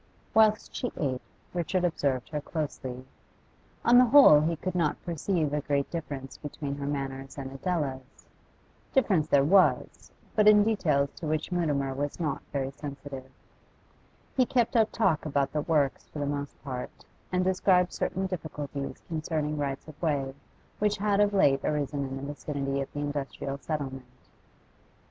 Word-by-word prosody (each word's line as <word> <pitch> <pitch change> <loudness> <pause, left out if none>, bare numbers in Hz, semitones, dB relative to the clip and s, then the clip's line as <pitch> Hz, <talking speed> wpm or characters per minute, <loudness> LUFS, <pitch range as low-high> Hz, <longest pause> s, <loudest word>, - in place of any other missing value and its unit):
Whilst 215 -1 +4
she 245 - -2
ate, 130 -4 -1 0.3
Richard 180 +1 0
observed 140 -7 0
her 150 -2 -3
closely; 135 -5 -5 0.8
on 245 +1 +7
the 250 - +7
whole 255 - +8
he 165 +2 +1
could 185 +4 -4
not 165 -4 0
perceive 165 -2 -1
a 150 - 0
great 140 -1 -1
difference 140 -5 -5
between 145 -1 -5
her 140 0 -4
manners 135 -1 -4
and 135 -1 -5
Adela's. 135 -3 -3 0.7
Difference 195 - +3
there 140 -3 +4
was, 185 +5 +3 0.2
but 215 -1 +4
in 210 -1 +8
details 150 -10 +1
to 160 - -5
which 155 +3 -1
Mutimer 145 -6 0
was 145 +4 -3
not 150 -5 -1
very 135 -1 -2
sensitive. 140 -2 -8 1.1
He 260 - +5
kept 245 -1 +1
up 220 -2 +4
talk 190 -9 +2
about 140 -3 0
the 150 - 0
works 145 -4 0
for - - -10
the 145 - -1
most 140 0 -4
part, 130 -3 -6 0.3
and 180 0 +2
described 185 -1 +3
certain 190 +1 -1
difficulties 150 -6 -5
concerning 155 -2 -2
rights 140 0 -3
of 155 -2 -13
way 140 -5 0 0.5
which 210 0 +1
had 205 0 +1
of 205 0 +4
late 140 -9 +3
arisen 145 -2 -1
in 135 0 -5
the 135 - -7
vicinity 140 -2 -3
of 135 - -5
the 145 - -4
industrial 140 -1 -4
settlement. 135 -5 -6
150 Hz, 160 wpm, -28 LUFS, 140-180 Hz, 1.1 s, whole